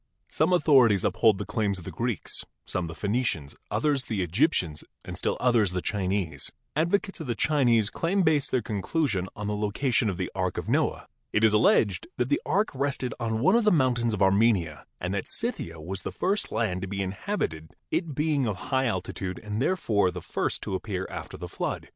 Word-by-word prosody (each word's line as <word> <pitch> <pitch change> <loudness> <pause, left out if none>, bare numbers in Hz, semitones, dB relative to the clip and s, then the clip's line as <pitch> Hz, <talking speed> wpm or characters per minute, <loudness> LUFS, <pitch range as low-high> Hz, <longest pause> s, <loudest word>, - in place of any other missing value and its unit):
Some - - +2
authorities 130 - +5
uphold 110 -4 +4
the - - -4
claims 100 -3 -1
of 90 - -10
the - - -5
Greeks, 120 -2 -3 0.2
some 90 -2 -2
the 80 - -7
Phenicians, 100 - -1
others 145 -4 +1
the 105 -5 -1
Egyptians 90 - +1 0.2
and - - -6
still - - -1
others 115 -7 +3
the 90 - -1
Chinese. 95 -7 -1 0.2
Advocates 185 +5 +1
of 160 - -6
the 120 - -1
Chinese 120 -7 +3
claim 190 +4 +1
base 150 -3 +3
their 125 -3 0
conclusion 105 - -1
on 105 - -5
the 105 0 -1
location 110 +3 +1
of 95 - -3
the - - -3
Ark - - -1
of - - -3
Noah. - - +1 0.3
It 105 - +1
is 110 -1 +5
alleged 105 -3 +3
that 125 0 0
the 145 - +2
ark 205 +3 +2
rested 135 -3 -1
on 110 -1 -1
one 185 - +5
of 235 - +4
the 210 - +4
mountains 120 -7 +2
of 100 - +1
Armenia 95 - +2
and 90 +2 -2
that 100 - -2
Scythia 85 - -3
was 90 +5 -5
the - - -4
first 200 +3 -1
land 95 -5 0
to 95 - -3
be 100 +1 -2
inhabited, 95 - -3 0.2
it 160 -6 -1
being 150 -3 +1
of 105 - -1 0.2
high 130 0 +3
altitude 95 -2 -3
and 105 +1 -3
therefore 110 - +2
the 90 0 -5
first - - -2
to - - -4
appear 95 -1 -3
after - - -7
the - - -6
flood. - - -4
110 Hz, 200 wpm, -27 LUFS, 95-140 Hz, 0.3 s, authorities